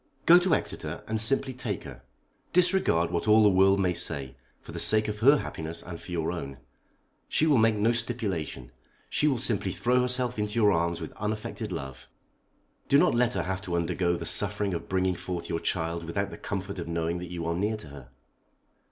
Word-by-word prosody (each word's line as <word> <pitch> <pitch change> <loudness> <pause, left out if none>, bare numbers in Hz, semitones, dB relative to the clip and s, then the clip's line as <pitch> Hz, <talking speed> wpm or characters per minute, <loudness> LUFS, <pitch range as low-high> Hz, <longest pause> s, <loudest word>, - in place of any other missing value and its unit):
"Go 175 +2 +8
to 180 -3 +2
Exeter, - - -4
and 110 0 -1
simply 130 +3 +1
take 115 -6 -4
her. - - -10 0.5
Disregard 180 - +3
what 85 - -2
all 110 +1 +6
the 105 - +6
world 95 +1 +4
may 90 -2 +1
say, 70 -5 -2 0.2
for - - -12
the - - -6
sake 110 0 +5
of 105 0 -4
her 140 +6 +6
happiness 80 - -4
and 85 -2 -8
for - - -11
your 80 -2 -1
own. 70 -6 -6 0.7
She 155 - +2
will 145 -6 +4
make 110 0 +3
no 105 +3 +2
stipulation. 105 - -3 0.4
She 150 - +2
will 135 -4 +2
simply 105 -5 0
throw 125 +6 +1
herself 125 -2 0
into 105 +1 -2
your 105 -3 +4
arms 85 -1 0
with 80 - -7
unaffected 105 +1 -4
love. 65 0 -7 0.8
Do 140 - +6
not - - +4
let 120 +1 +2
her - - -1
have 95 0 -3
to 90 -2 -4
undergo 85 +1 0
the - - -6
suffering 100 -2 +2
of 85 - -5
bringing 95 0 +1
forth 85 0 -5
your 80 - -1
child 85 -1 -2
without 100 +4 -3
the - - -8
comfort 100 -1 -5
of 85 - -5
knowing 85 +1 -2
that 90 -1 -7
you 85 -2 -5
are 85 - -1
near 105 +5 -1
to 105 - -12
her." 70 -3 -12
95 Hz, 205 wpm, -27 LUFS, 85-115 Hz, 0.8 s, Go